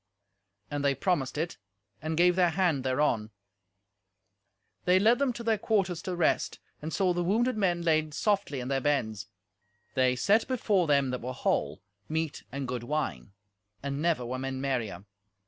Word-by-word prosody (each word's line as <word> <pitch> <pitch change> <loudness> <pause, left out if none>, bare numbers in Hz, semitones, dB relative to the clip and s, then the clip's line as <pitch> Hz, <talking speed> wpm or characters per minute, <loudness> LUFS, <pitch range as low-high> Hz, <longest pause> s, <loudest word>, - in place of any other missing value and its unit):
And 145 -1 -2
they 140 -1 +3
promised 145 -3 0
it, 165 +2 -3 0.4
and 160 0 -2
gave 180 +1 +5
their 180 -2 +4
hand 165 -5 +1
thereon. 130 -5 +1 1.6
They 180 +1 +5
led 225 +5 +4
them 280 -2 +2
to 235 - -7
their 225 -2 +1
quarters 195 -6 0
to 185 - -3
rest, 170 -2 +1 0.2
and 155 +2 -4
saw 185 -1 +2
the 175 0 0
wounded 230 +7 +2
men 180 -5 +1
laid 155 -2 +1
softly 200 - 0
in 125 - -5
their 135 0 0
beds. 110 -8 0 0.7
They 130 -1 +3
set 205 - +3
before 210 -8 +1
them 140 -3 +3
that 125 - -3
were 125 +2 -4
whole 75 - -1 0.3
meat 160 -1 -2
and 135 0 -4
good 125 -1 -3
wine, 120 - -3 0.5
and 140 +1 -3
never 165 -7 +1
were 130 +2 -3
men 135 0 -3
merrier. 120 -9 -2
155 Hz, 165 wpm, -29 LUFS, 130-180 Hz, 1.6 s, gave